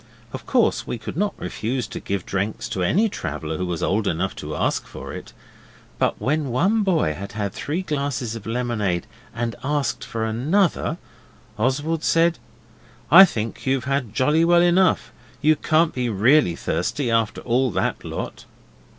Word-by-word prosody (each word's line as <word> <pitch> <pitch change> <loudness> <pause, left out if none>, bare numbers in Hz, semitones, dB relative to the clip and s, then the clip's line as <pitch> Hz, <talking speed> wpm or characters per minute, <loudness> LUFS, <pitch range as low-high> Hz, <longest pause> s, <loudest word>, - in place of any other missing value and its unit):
Of - - -7
course - - +2
we - - -3
could 110 - -7
not 205 +4 0
refuse 125 +2 -3
to - - -7
give 100 -3 -3
drinks 100 +2 -2
to 95 - -3
any 195 - +3
traveller 80 - -4
who 90 - -2
was 85 -2 -3
old 100 +2 +1
enough 90 +3 -1
to - - -5
ask - - -1
for - - -8
it, - - -8 0.7
but - - +1
when 150 +1 0
one 190 - +2
boy 170 - +1
had 100 +4 -8
had 100 -2 -3
three 160 +7 -3
glasses 140 -7 -2
of 115 - -8
lemonade 115 -7 -1 0.3
and 115 -1 -3
asked 145 0 -1
for 115 -1 -3
another, 155 - +1 0.6
Oswald 145 +7 0
said 165 -2 +3 0.7
'I 190 +5 +11
think 115 - -5
you've 130 -1 +1
had 135 -5 -2
jolly 150 +7 +3
well 175 +1 +5
enough. 175 -8 +3 0.3
You 155 +2 +4
can't 155 +2 +2
be 125 -2 -1
really 110 - +4
thirsty 120 - -1
after 115 -1 +1
all 130 +2 +1
that - - -1
lot. - - -6
125 Hz, 165 wpm, -23 LUFS, 110-155 Hz, 0.7 s, I